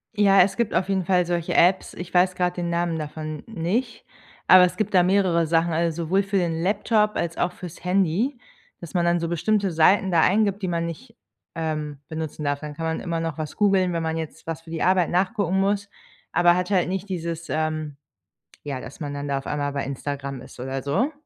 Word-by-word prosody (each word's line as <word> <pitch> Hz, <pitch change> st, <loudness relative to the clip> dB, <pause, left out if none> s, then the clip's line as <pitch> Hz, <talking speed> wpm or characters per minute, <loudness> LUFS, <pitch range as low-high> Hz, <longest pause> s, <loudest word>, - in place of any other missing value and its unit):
Ja, 195 Hz, -1 st, +6 dB
es 185 Hz, +2 st, +2 dB
gibt 235 Hz, -3 st, 0 dB
auf 185 Hz, +3 st, 0 dB
jeden 190 Hz, -2 st, 0 dB
Fall 180 Hz, -1 st, +3 dB
solche 170 Hz, -1 st, -2 dB
Apps, 185 Hz, +2 st, +3 dB
ich 175 Hz, 0 st, -8 dB
weiß 180 Hz, +1 st, +3 dB
gerade 180 Hz, -1 st, 0 dB
den 175 Hz, -1 st, -2 dB
Namen 170 Hz, -1 st, 0 dB
davon 155 Hz, 0 st, -6 dB
nicht, 225 Hz, +5 st, -3 dB, 0.4 s
aber 185 Hz, 0 st, +9 dB
es 180 Hz, 0 st, +1 dB
gibt 215 Hz, -1 st, -2 dB
da 180 Hz, -2 st, +6 dB
mehrere 180 Hz, -3 st, +2 dB
Sachen, 165 Hz, +1 st, +2 dB
also, 165 Hz, 0 st, 0 dB
sowohl 190 Hz, +5 st, +2 dB
für 195 Hz, 0 st, -1 dB
den 165 Hz, -3 st, 0 dB
Laptop 210 Hz, +3 st, +1 dB
als 165 Hz, -1 st, -2 dB
auch 175 Hz, -, 0 dB
fürs 180 Hz, -2 st, -10 dB
Handy, 195 Hz, -, +1 dB, 0.4 s
dass 170 Hz, -, -10 dB
man 175 Hz, -2 st, +1 dB
dann 170 Hz, 0 st, +2 dB
so 170 Hz, -, -2 dB
bestimmte 195 Hz, +4 st, 0 dB
Seiten 180 Hz, +4 st, +4 dB
da 170 Hz, -2 st, +4 dB
eingibt, 200 Hz, +2 st, +2 dB
die 190 Hz, -, -2 dB
man 170 Hz, -1 st, -1 dB
nicht, 165 Hz, -2 st, -8 dB, 0.4 s
ähm, 155 Hz, -3 st, -3 dB
benutzen 160 Hz, -1 st, -5 dB
darf. 145 Hz, -1 st, 0 dB
Dann 150 Hz, -1 st, -7 dB
kann 165 Hz, +1 st, -4 dB
man 160 Hz, 0 st, -1 dB
immer 170 Hz, -2 st, -3 dB
noch 165 Hz, -1 st, -3 dB
was 155 Hz, -2 st, -5 dB
googeln, 195 Hz, -3 st, +3 dB
wenn 165 Hz, -1 st, -1 dB
man 160 Hz, 0 st, -1 dB
jetzt 160 Hz, -2 st, -7 dB
was 165 Hz, -1 st, -4 dB
für 165 Hz, -, -15 dB
die 165 Hz, -1 st, -3 dB
Arbeit 185 Hz, -2 st, +3 dB
nachgucken 190 Hz, 0 st, +1 dB
muss, 200 Hz, +1 st, 0 dB, 0.4 s
aber 175 Hz, 0 st, +4 dB
hat 180 Hz, +1 st, -1 dB
halt 185 Hz, -3 st, +2 dB
nicht 190 Hz, +2 st, -3 dB
dieses, 170 Hz, -2 st, -4 dB
ähm 155 Hz, -2 st, -2 dB, 0.7 s
ja, 140 Hz, -3 st, -3 dB
dass 130 Hz, +5 st, -10 dB
man 145 Hz, -2 st, -4 dB
dann 145 Hz, 0 st, -4 dB
da 140 Hz, -1 st, 0 dB
auf 135 Hz, -, -12 dB
einmal 145 Hz, -1 st, -2 dB
bei 140 Hz, -, -2 dB
Instagram 140 Hz, 0 st, -5 dB
ist 130 Hz, +1 st, -13 dB
oder 130 Hz, +2 st, -4 dB
so. 145 Hz, -, 0 dB
170 Hz, 220 wpm, -24 LUFS, 155-190 Hz, 0.7 s, aber